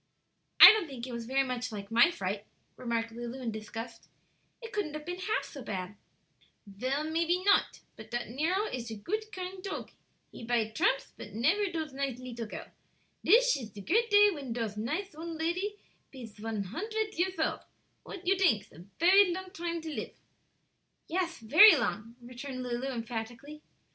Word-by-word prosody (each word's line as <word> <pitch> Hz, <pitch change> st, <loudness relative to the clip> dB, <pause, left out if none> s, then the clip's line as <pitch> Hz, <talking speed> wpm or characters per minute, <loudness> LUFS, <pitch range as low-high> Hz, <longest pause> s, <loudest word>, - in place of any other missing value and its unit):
'" -, -, -48 dB
"I -, -, +14 dB
don't 430 Hz, -5 st, 0 dB
think 255 Hz, -4 st, -7 dB
it 255 Hz, -, -7 dB
was 235 Hz, -1 st, -5 dB
very 270 Hz, +2 st, +2 dB
much 250 Hz, -2 st, -3 dB
like 200 Hz, -1 st, -7 dB
my 235 Hz, +8 st, +6 dB
fright," 205 Hz, -, -4 dB, 0.3 s
remarked 230 Hz, -2 st, -2 dB
Lulu, 240 Hz, +2 st, -6 dB
in 240 Hz, -3 st, -3 dB
disgust; 220 Hz, +2 st, -8 dB, 0.5 s
"it 460 Hz, -2 st, -10 dB
couldn't 395 Hz, -8 st, -2 dB
have 305 Hz, 0 st, -7 dB
been 355 Hz, +2 st, -5 dB
half 425 Hz, +4 st, -1 dB
so 280 Hz, -, -9 dB
bad." 190 Hz, -4 st, -5 dB, 0.7 s
"Vell, 255 Hz, +9 st, -2 dB
maype 335 Hz, +3 st, 0 dB
not; 405 Hz, -, +3 dB
but -, -, -12 dB
dat 240 Hz, 0 st, -3 dB
Nero 330 Hz, -, 0 dB
ish 245 Hz, -, -5 dB
a 220 Hz, -, -5 dB
goot, 430 Hz, -, -4 dB
kind 370 Hz, 0 st, -6 dB
tog; 390 Hz, -, -5 dB, 0.4 s
he -, -, -10 dB
bide 225 Hz, -2 st, 0 dB
dramps, 270 Hz, +5 st, +1 dB
but 205 Hz, -, -10 dB
nefer 350 Hz, -, +1 dB
dose 315 Hz, -4 st, -4 dB
nice 270 Hz, -2 st, -2 dB
leetle 240 Hz, -3 st, -6 dB
girl. -, -, -7 dB, 0.6 s
Dis -, -, +5 dB
ish 235 Hz, -5 st, -6 dB
de 205 Hz, -, -10 dB
great 455 Hz, -, +1 dB
day 410 Hz, 0 st, +6 dB
when 280 Hz, -8 st, -5 dB
dose 225 Hz, -3 st, -3 dB
nice 310 Hz, -, -3 dB
old 325 Hz, +1 st, -6 dB
lady 365 Hz, +6 st, -1 dB, 0.4 s
pees 240 Hz, -6 st, -10 dB
von 215 Hz, -1 st, -3 dB
huntred 430 Hz, -, -3 dB
years 370 Hz, +2 st, -1 dB
old. -, -, 0 dB, 0.4 s
What 375 Hz, -1 st, -10 dB
you 380 Hz, +2 st, +4 dB
dinks? 330 Hz, -, +2 dB
a 170 Hz, +3 st, -13 dB
fery 370 Hz, +2 st, +6 dB
long 370 Hz, +1 st, -5 dB
dime 340 Hz, -3 st, -3 dB
to 320 Hz, -, -6 dB
live?" -, -, -5 dB, 0.9 s
"Yes; 355 Hz, 0 st, -1 dB
very 315 Hz, -, +8 dB
long," 230 Hz, -4 st, -2 dB
returned 255 Hz, +1 st, -7 dB
Lulu, 245 Hz, +1 st, -3 dB
emphatically. 240 Hz, +4 st, -6 dB
275 Hz, 180 wpm, -30 LUFS, 230-365 Hz, 0.9 s, I